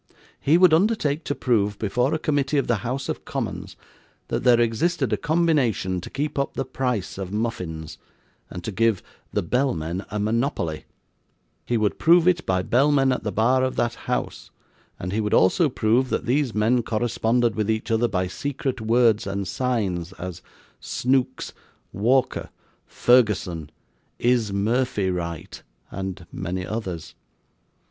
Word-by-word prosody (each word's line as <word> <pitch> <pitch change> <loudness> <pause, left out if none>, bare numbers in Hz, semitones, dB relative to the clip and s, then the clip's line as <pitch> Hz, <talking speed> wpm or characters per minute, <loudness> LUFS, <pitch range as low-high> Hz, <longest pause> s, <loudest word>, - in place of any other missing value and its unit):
He 155 +4 +4
would 180 -2 +6
undertake 165 -5 +2
to 145 - -1
prove 105 -5 +1
before 125 +6 0
a - - +1
committee 145 -2 0
of 140 - +2
the 120 - +1
House 130 +5 -3
of - - -4
Commons, - - -5 0.5
that - - -1
there 120 -1 +5
existed 120 +3 +1
a - - +4
combination 140 - +1
to - - -8
keep 145 0 -3
up 140 - -2
the 135 - -2
price 125 -9 -2
of 95 -1 -5
muffins, 90 -8 -4 0.5
and 90 - -7
to 110 - -3
give 115 -1 +1 0.3
the - - 0
bellmen 90 - -1
a 105 - -3
monopoly; 105 - -1 0.8
he 120 - +1
would 105 -2 0
prove 170 +1 +5
it 175 -2 +3
by 90 -1 +1
bellmen 135 +3 +3
at 125 - -1
the 105 - -2
bar 125 +5 +2
of 130 - -1
that 120 0 0 0.2
House; - - -3 0.5
and 90 - -4
he 110 - +1
would 105 -1 +1
also 145 - +4
prove, 125 +2 +1
that - - -1
these 130 -1 +1
men 115 +4 +3
corresponded 115 +1 +1
with 110 -1 -1
each 110 +1 -1
other 115 +1 +3
by 95 -4 -1
secret 135 +5 -3
words 115 -2 +3
and 100 -1 -3
signs 100 -9 -1
as 90 -1 -7 0.4
'Snooks,' 130 0 -1 0.4
'Walker,' 125 +6 +1 0.4
'Ferguson,' 95 -10 +2 0.5
'Is 120 -4 +2
Murphy 105 -1 0
right?' 85 -3 -5 0.3
and 95 -2 -5
many 90 +1 -4
others. 95 -7 -5
115 Hz, 155 wpm, -24 LUFS, 100-130 Hz, 0.8 s, would